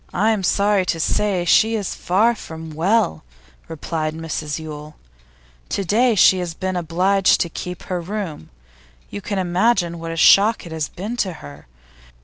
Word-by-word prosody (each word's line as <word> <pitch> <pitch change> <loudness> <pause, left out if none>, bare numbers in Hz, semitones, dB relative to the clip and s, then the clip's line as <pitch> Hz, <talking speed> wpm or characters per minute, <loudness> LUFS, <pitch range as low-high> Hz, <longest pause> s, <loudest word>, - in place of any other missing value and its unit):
'I'm 215 +1 +2
sorry 200 +1 +2
to 165 - -1
say 185 +2 0
she 220 +5 +4
is 205 -4 -3
far 210 +7 +2
from 160 -6 -9
well,' 160 - 0 0.4
replied 160 0 -4
Mrs 155 -2 -4
Yule. 155 -1 -9 0.7
'To 200 - -2
day 230 +5 +2
she 190 -1 +5
has 175 -2 -4
been 185 +1 -3
obliged 180 +3 +2
to 170 - -1
keep 180 +2 -7
her 180 -2 -3
room. 180 - -6 0.6
You 205 - -6
can 200 +1 -4
imagine 180 -1 +1
what 165 0 -6
a 165 - -5
shock 205 +6 +5
it 170 - -10
has 160 -2 -3
been 215 +7 -6
to 190 -6 -1
her. 70 - -12
180 Hz, 160 wpm, -20 LUFS, 160-205 Hz, 0.7 s, she